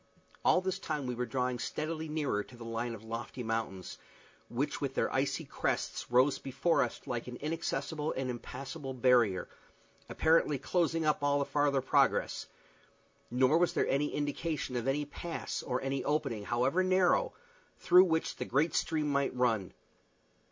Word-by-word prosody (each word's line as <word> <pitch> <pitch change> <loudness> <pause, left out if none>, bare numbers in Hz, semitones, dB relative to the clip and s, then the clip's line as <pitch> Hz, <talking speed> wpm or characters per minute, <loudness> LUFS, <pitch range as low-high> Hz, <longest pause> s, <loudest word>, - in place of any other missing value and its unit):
All 185 - +4
this 185 0 -2
time 145 -3 -3
we 125 - -2
were 125 0 -3
drawing 125 -2 -1
steadily 155 +3 -3
nearer 145 -9 -1
to 120 - -15
the 115 - -9
line 115 +1 -3
of 110 - -12
lofty 115 +2 -5
mountains, 110 -5 -3 0.5
which - - -2
with - - -2
their - - 0
icy - - 0
crests - - -2
rose 130 +3 +4
before 140 +6 +1
us 120 - -2
like 120 -1 -3
an 125 - -6
inaccessible 150 0 -2
and 130 0 -2
impassable 135 +3 -6
barrier, 120 -6 +3 0.6
apparently 160 -2 +3
closing 165 +3 0
up 150 -1 +2
all 145 0 +2
farther 145 -2 +1
progress; 130 - +2 0.8
nor 130 +6 +3
was 175 - +2
there - - +1
any 140 +2 +1
indication 145 -1 -2
of 120 +1 -2
any 145 +2 +1
pass 165 +3 -5
or 125 -1 -2
any 135 0 -1
opening, 115 -8 -1
however 130 - +2
narrow, 185 - +3 0.4
through 180 +1 +6
which 160 -2 0
the 125 - -3
great 145 +7 +1
stream 155 -2 0
might 140 -2 0
run. 115 -7 +1
135 Hz, 160 wpm, -32 LUFS, 125-155 Hz, 0.8 s, through